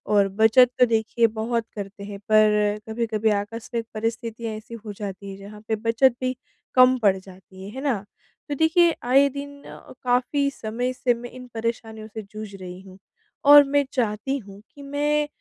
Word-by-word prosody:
और 200 Hz, -1 st, +5 dB
बचत 240 Hz, +3 st, +6 dB
तो 250 Hz, -, +7 dB
देखिए 230 Hz, 0 st, +2 dB
बहुत 225 Hz, +1 st, -2 dB
करते 200 Hz, 0 st, -7 dB
हैं, 200 Hz, 0 st, -7 dB
पर 210 Hz, 0 st, +3 dB
कभी-कभी 220 Hz, -1 st, 0 dB
आकस्मिक 225 Hz, +3 st, -3 dB
परिस्थितियाँ 225 Hz, 0 st, -3 dB
ऐसी 215 Hz, +2 st, -10 dB
हो 210 Hz, -, -5 dB
जाती 200 Hz, -1 st, -7 dB
है 195 Hz, -, -9 dB
जहाँ 205 Hz, +2 st, -11 dB
पे 220 Hz, -, +1 dB
बचत 230 Hz, +3 st, +2 dB
भी 255 Hz, 0 st, -1 dB, 0.4 s
कम 255 Hz, 0 st, +6 dB
पड़ 200 Hz, -4 st, +4 dB
जाती 190 Hz, 0 st, -14 dB
है। 195 Hz, -, -7 dB
है 265 Hz, -, -5 dB
ना? 235 Hz, -9 st, -1 dB, 0.4 s
तो 290 Hz, -, -1 dB
देखिए 320 Hz, +3 st, +4 dB
आए 270 Hz, +3 st, +5 dB
दिन 285 Hz, +1 st, -8 dB
अ, -, -, -12 dB
काफ़ी 255 Hz, +3 st, +1 dB
समय 245 Hz, +1 st, -3 dB
से 250 Hz, -1 st, +1 dB
मैं 240 Hz, +1 st, -8 dB
इन 250 Hz, +1 st, -11 dB
परेशानियों 225 Hz, -1 st, -4 dB
से 220 Hz, 0 st, -7 dB
जूझ 215 Hz, -2 st, -8 dB
रही 185 Hz, -1 st, -9 dB
हूँ। 190 Hz, -1 st, -14 dB, 0.5 s
और 290 Hz, 0 st, +10 dB
मैं 285 Hz, 0 st, +2 dB
चाहती 240 Hz, +2 st, -1 dB
हूँ 200 Hz, -5 st, -12 dB
कि 285 Hz, -, -12 dB
मैं 295 Hz, +1 st, 0 dB
225 Hz, 180 wpm, -24 LUFS, 210-255 Hz, 0.5 s, और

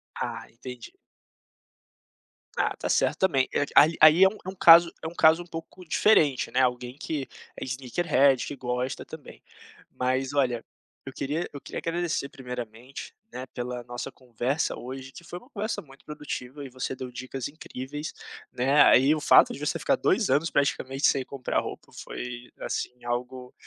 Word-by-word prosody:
Ah, 115 Hz, -1 st, -4 dB
entendi. 125 Hz, -, -10 dB, 1.6 s
Ah, -, -, +1 dB
está -, -, -5 dB
certo -, -, +2 dB
também, 140 Hz, -9 st, +2 dB, 0.3 s
aí 160 Hz, +3 st, +7 dB
aí 155 Hz, +4 st, +8 dB
é -, -, +9 dB
um 215 Hz, -, -11 dB
é -, -, -4 dB
um 190 Hz, -, -7 dB
caso 170 Hz, 0 st, +8 dB
é -, -, -2 dB
um 165 Hz, -, -7 dB
caso 160 Hz, +1 st, +5 dB
um -, -, -17 dB
pouco 165 Hz, +2 st, -9 dB
diferente, 155 Hz, -7 st, +3 dB
né, 130 Hz, -, +2 dB
alguém 125 Hz, +1 st, -1 dB
que 150 Hz, -4 st, -4 dB, 0.3 s
sneaker 130 Hz, +6 st, -3 dB
head 135 Hz, -2 st, +4 dB
e -, -, -8 dB
que 145 Hz, -, -5 dB
gosta 125 Hz, 0 st, -3 dB
também, -, -, -12 dB, 0.5 s
Mas 130 Hz, +2 st, -1 dB
olha, 125 Hz, -5 st, +1 dB, 0.4 s
eu 135 Hz, -, -8 dB
queria 150 Hz, +5 st, -2 dB
eu 140 Hz, -, -7 dB
queria -, -, -6 dB
agradecer 165 Hz, -4 st, -2 dB
primeiramente, 125 Hz, -1 st, -8 dB, 0.2 s
né, 130 Hz, -, -6 dB
pela 125 Hz, 0 st, -5 dB
nossa 120 Hz, +2 st, -6 dB
conversa 125 Hz, +4 st, -2 dB
hoje 130 Hz, +2 st, -8 dB
que 170 Hz, -, -12 dB
foi 175 Hz, +1 st, -8 dB
uma 250 Hz, -, -21 dB
conversa 215 Hz, -1 st, -3 dB
muito 135 Hz, -2 st, -19 dB
produtiva 145 Hz, -2 st, -6 dB
e -, -, -8 dB
você 130 Hz, +1 st, -4 dB
deu 125 Hz, -1 st, -7 dB
dicas 130 Hz, +1 st, -5 dB
incríveis, 145 Hz, 0 st, -7 dB, 0.4 s
né, 135 Hz, +4 st, +3 dB
aí 135 Hz, +4 st, +6 dB
o 150 Hz, -, -4 dB
fato -, -, +6 dB
de -, -, -8 dB
você -, -, -1 dB
ficar -, -, +2 dB
2 -, -, +1 dB
anos 150 Hz, +5 st, +2 dB
praticamente 140 Hz, -1 st, 0 dB
sem 135 Hz, -2 st, +1 dB
comprar 135 Hz, -2 st, -2 dB
roupa -, -, -7 dB
foi, 125 Hz, 0 st, -7 dB
assim, 125 Hz, -1 st, -4 dB
algo 125 Hz, +1 st, -4 dB
135 Hz, 170 wpm, -27 LUFS, 125-155 Hz, 1.6 s, é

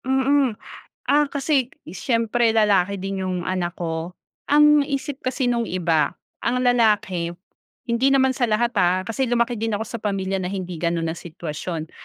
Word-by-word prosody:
Mm. 265 Hz, -2 st, +2 dB, 0.5 s
Ah, 295 Hz, +1 st, +4 dB
kasi 275 Hz, -3 st, 0 dB, 0.2 s
siyempre 230 Hz, +5 st, 0 dB
lalaki 200 Hz, -3 st, +3 dB
din 195 Hz, 0 st, -4 dB
yung 185 Hz, -1 st, -2 dB
anak 185 Hz, -1 st, -2 dB
ko, 165 Hz, +1 st, -4 dB, 0.3 s
ang 300 Hz, 0 st, +6 dB
isip 275 Hz, -1 st, -3 dB
kasi 255 Hz, +1 st, -1 dB
nung 240 Hz, -1 st, +1 dB
iba 165 Hz, -5 st, +1 dB, 0.3 s
ang 250 Hz, +2 st, 0 dB
lalaki 210 Hz, -8 st, +2 dB, 0.6 s
hindi 235 Hz, +3 st, +3 dB
naman 265 Hz, -1 st, +4 dB
sa 255 Hz, -1 st, 0 dB
lahat 230 Hz, +2 st, +1 dB
ha, 180 Hz, +1 st, +3 dB
kasi 225 Hz, +6 st, -1 dB
lumaki 235 Hz, 0 st, +1 dB
din 225 Hz, 0 st, -1 dB
ako 210 Hz, -, -2 dB
sa 235 Hz, +1 st, -6 dB
pamilya 195 Hz, -2 st, -1 dB
na 180 Hz, -, -3 dB
hindi 185 Hz, -2 st, -5 dB
gano'n 170 Hz, -1 st, 0 dB
ang 165 Hz, -, -7 dB
sitwasyon. 165 Hz, -1 st, -6 dB
215 Hz, 160 wpm, -22 LUFS, 180-250 Hz, 0.6 s, ang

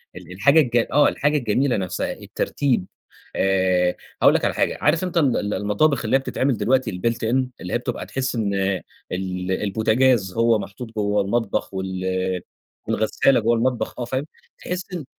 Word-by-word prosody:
ال 90 Hz, -, -11 dB
الحاجة 140 Hz, -, +4 dB
الج 120 Hz, -5 st, +2 dB
آه، 145 Hz, +1 st, +5 dB
الحاجة 150 Hz, +1 st, +1 dB
الجميلة 125 Hz, +1 st, +1 dB
نفْسها 95 Hz, -2 st, -2 dB
الترتيب. 130 Hz, -10 st, -1 dB, 0.5 s
آآ 95 Hz, -2 st, +2 dB, 0.3 s
هاقول -, -, +6 dB
لك -, -, +1 dB
على -, -, +1 dB
حاجة، -, -, 0 dB
عارف 160 Hz, +4 st, +2 dB
أنت 180 Hz, -2 st, -2 dB
ال 140 Hz, -7 st, +3 dB
ال 105 Hz, 0 st, -2 dB
المطابخ 110 Hz, +6 st, +1 dB
اللي 110 Hz, -, +2 dB
هي -, -, +5 dB
بتتعمل 135 Hz, -2 st, -1 dB
دلوقتي 130 Hz, -1 st, +1 dB
الbuilt 115 Hz, +6 st, -1 dB, 0.2 s
in 130 Hz, 0 st, +2 dB, 0.2 s
اللي 90 Hz, -, -5 dB
هي -, -, +3 dB
بتبقى 125 Hz, 0 st, -4 dB
تحس 130 Hz, -1 st, -3 dB
إن 105 Hz, -3 st, -1 dB, 0.6 s
ال 90 Hz, 0 st, -3 dB
البوتجاز، 110 Hz, +1 st, +2 dB
هو 115 Hz, -1 st, +3 dB
محطوط 100 Hz, +4 st, -8 dB
جوّه 105 Hz, -1 st, +1 dB
المطبخ 100 Hz, 0 st, -1 dB
وال 95 Hz, -1 st, -2 dB, 0.5 s
والغسالة 115 Hz, +4 st, +2 dB
جوّه 115 Hz, +2 st, +2 dB
المطبخ، 125 Hz, +1 st, -1 dB
آه، 120 Hz, -, -2 dB
فاهم؟ 130 Hz, +4 st, -2 dB, 0.3 s
تحس 180 Hz, +1 st, -5 dB
إن 165 Hz, -6 st, -5 dB
115 Hz, 170 wpm, -22 LUFS, 95-130 Hz, 0.6 s, هاقول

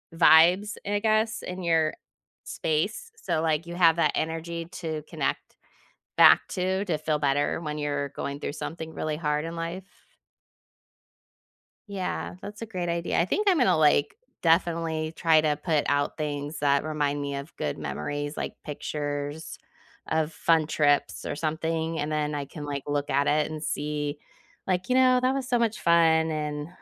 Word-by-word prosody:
vibes, 175 Hz, +6 st, +6 dB
I 205 Hz, 0 st, +1 dB
guess, 220 Hz, +1 st, +1 dB
in 180 Hz, 0 st, -6 dB
your 160 Hz, -2 st, +2 dB, 0.5 s
space, 195 Hz, -, -2 dB
so, 455 Hz, -, -1 dB
like, 160 Hz, 0 st, 0 dB
you 170 Hz, -, -6 dB
have 165 Hz, -2 st, +5 dB
that 170 Hz, -, +3 dB
energy 165 Hz, +1 st, -3 dB
to 160 Hz, -3 st, -4 dB
connect -, -, -1 dB, 0.8 s
back -, -, +8 dB
to 190 Hz, +1 st, -1 dB
to 170 Hz, -5 st, 0 dB
feel 155 Hz, 0 st, -1 dB
better 145 Hz, +2 st, +1 dB
when 150 Hz, -2 st, -4 dB
you're 145 Hz, -1 st, -2 dB
going 140 Hz, 0 st, -5 dB
through -, -, -3 dB
something 160 Hz, +1 st, -6 dB
really 155 Hz, -1 st, -2 dB
hard 150 Hz, -1 st, -1 dB
in 165 Hz, +1 st, -5 dB
life. 170 Hz, +3 st, -4 dB, 2.1 s
Yeah. 190 Hz, -3 st, -4 dB
That's 210 Hz, +2 st, -9 dB
a -, -, -3 dB
great 180 Hz, -6 st, -4 dB
idea. 170 Hz, 0 st, 0 dB
I 170 Hz, -, +3 dB
think 415 Hz, -, -1 dB
I'm 365 Hz, -, +3 dB
gonna, 250 Hz, -, +4 dB
like, 150 Hz, -, +3 dB, 0.2 s
definitely, 165 Hz, -1 st, +1 dB
try 160 Hz, -2 st, +4 dB
to 150 Hz, -1 st, +1 dB
put 155 Hz, -4 st, +1 dB
out 145 Hz, 0 st, 0 dB
things 150 Hz, 0 st, -4 dB
that 140 Hz, -1 st, +2 dB
remind 145 Hz, -2 st, -1 dB
me 140 Hz, 0 st, -3 dB
of 140 Hz, +4 st, -7 dB
good 75 Hz, -, -3 dB
memories, 145 Hz, -, -4 dB
like -, -, -4 dB
pictures 145 Hz, 0 st, -4 dB, 0.5 s
of 160 Hz, 0 st, 0 dB
fun 165 Hz, -2 st, +2 dB
trips, 145 Hz, -2 st, +1 dB
or -, -, -3 dB
something, 160 Hz, +1 st, -2 dB
and 150 Hz, +1 st, -2 dB
then 150 Hz, -1 st, -1 dB
I 145 Hz, -1 st, -3 dB
can, 145 Hz, +1 st, -8 dB
like, 140 Hz, -2 st, -4 dB
look 145 Hz, 0 st, -1 dB
at 140 Hz, +2 st, +2 dB
it 150 Hz, +1 st, +2 dB
and 155 Hz, 0 st, -6 dB
see, 150 Hz, -1 st, -3 dB, 0.5 s
like, 185 Hz, +4 st, -1 dB
"You 255 Hz, -, +3 dB
know, 255 Hz, -1 st, +5 dB
that 255 Hz, +1 st, +2 dB
was 270 Hz, -1 st, -3 dB
so 245 Hz, -, +2 dB
much 225 Hz, -2 st, 0 dB
fun, 160 Hz, -1 st, +4 dB
and, 150 Hz, -1 st, -3 dB
160 Hz, 170 wpm, -26 LUFS, 150-170 Hz, 2.1 s, back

